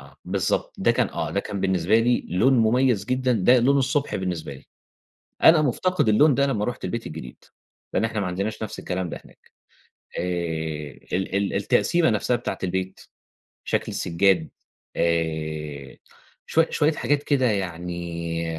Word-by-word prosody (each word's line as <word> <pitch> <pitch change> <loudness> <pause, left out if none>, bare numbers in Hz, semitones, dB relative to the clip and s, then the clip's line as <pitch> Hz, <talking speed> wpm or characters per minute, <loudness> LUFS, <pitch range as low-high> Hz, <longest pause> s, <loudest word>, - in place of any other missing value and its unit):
آه 70 - -16
بالضبط - - -1
ده - - +3
كان - - +1
آه - - -3
ده - - 0
كان 100 -2 -5
بالنسبة 95 +3 +2
لي 120 +1 +1
لون 110 +10 +3
م‍ُميَّز 115 -2 +3
جدًا 130 0 0
ده 120 +4 +4
لون 140 +4 +3
الصبح 140 +2 0
بالنسبة 90 -6 -4
لي. - - -14 0.8
أنا 160 -1 +8
مُفتقد 155 0 +1
اللون 140 +5 +5
ده 140 - +3
لما 110 -7 -1
رُحت 125 - -4
البيت 115 +2 -4
الجديد. 75 -6 -9 0.5
لأن 105 - +1
إحنا 110 -2 -3
ما 95 - -1
عندناش 100 +5 -3
نفس 110 - -6
الكلام 90 -1 -3
ده - - -7
هناك. - - -21 0.7
آآ - - 0 0.9
ال 95 +1 -1
ال 100 0 0
التقسيمة 105 - +2
نفسها 110 +3 +1
بتاعة 120 - -4
البيت، 95 +1 -3 0.6
شكل - - 0
السِّجاد. 90 -1 +1 0.5
آآ 80 -4 -2 0.5
شوي 165 0 +3
شوية 155 +1 +2
حاجات 145 0 0
كده 135 -4 +1
يعني 85 -4 -3
100 Hz, 155 wpm, -24 LUFS, 85-125 Hz, 0.9 s, أنا